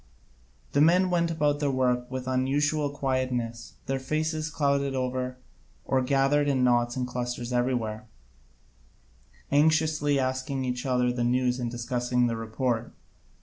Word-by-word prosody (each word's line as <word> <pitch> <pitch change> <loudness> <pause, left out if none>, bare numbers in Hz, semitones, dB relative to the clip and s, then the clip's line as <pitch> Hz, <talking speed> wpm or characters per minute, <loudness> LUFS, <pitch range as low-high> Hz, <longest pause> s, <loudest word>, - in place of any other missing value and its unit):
The 140 - +2
men 180 +4 +4
went 170 -1 +2
about 150 -3 +1
their 145 -1 +1
work 125 -2 0
with 130 -1 -4
an 130 0 0
unusual 145 +3 +1
quietness, 130 -4 -2
their 135 0 -1
faces 155 +3 -2
clouded 140 -2 0
over, 130 0 -2 0.5
or 130 -1 +1
gathered 135 +2 +2
in 135 -3 +2
knots 120 -1 +2
and 130 -1 -1
clusters 125 0 -4
everywhere, 120 -2 -1 1.4
anxiously 150 0 +3
asking 130 +1 -2
each 125 +1 -3
other 125 -1 +2
the 120 -1 -1
news 125 +1 +1
and 120 -1 -2
discussing 125 +1 0
the 115 -1 0
report. 115 +1 -2
130 Hz, 140 wpm, -27 LUFS, 125-145 Hz, 1.4 s, men